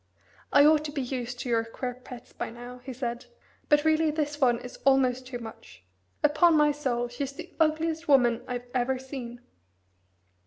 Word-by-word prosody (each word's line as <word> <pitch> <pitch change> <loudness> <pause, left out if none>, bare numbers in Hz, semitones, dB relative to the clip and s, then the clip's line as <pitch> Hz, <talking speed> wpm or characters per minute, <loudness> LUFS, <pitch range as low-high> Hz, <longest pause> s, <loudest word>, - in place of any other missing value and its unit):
"I 285 0 +7
ought 305 0 +5
to 295 - -4
be 285 -3 -3
used 245 -1 -4
to 245 - -5
your 230 -1 +2
queer 250 +2 -5
pets 250 0 -12
by - - -4
now," 245 +2 -10
he 255 +2 -8
said; 240 -1 -4 0.4
"but 295 +1 +4
really 315 0 +3
this 295 -1 -2
one 245 -3 +4
is 245 +1 -9
almost 260 -2 +3
too 255 -1 -5
much. 225 - -11 0.4
Upon 305 +2 +5
my 300 0 +5
soul, 255 -5 -1
she's 260 +3 -5
the 345 +5 -10
ugliest 320 +1 +1
woman 245 -5 +4
I've 245 -1 -4
ever 255 +1 +1
seen." 255 -2 -8
260 Hz, 180 wpm, -27 LUFS, 245-295 Hz, 0.4 s, I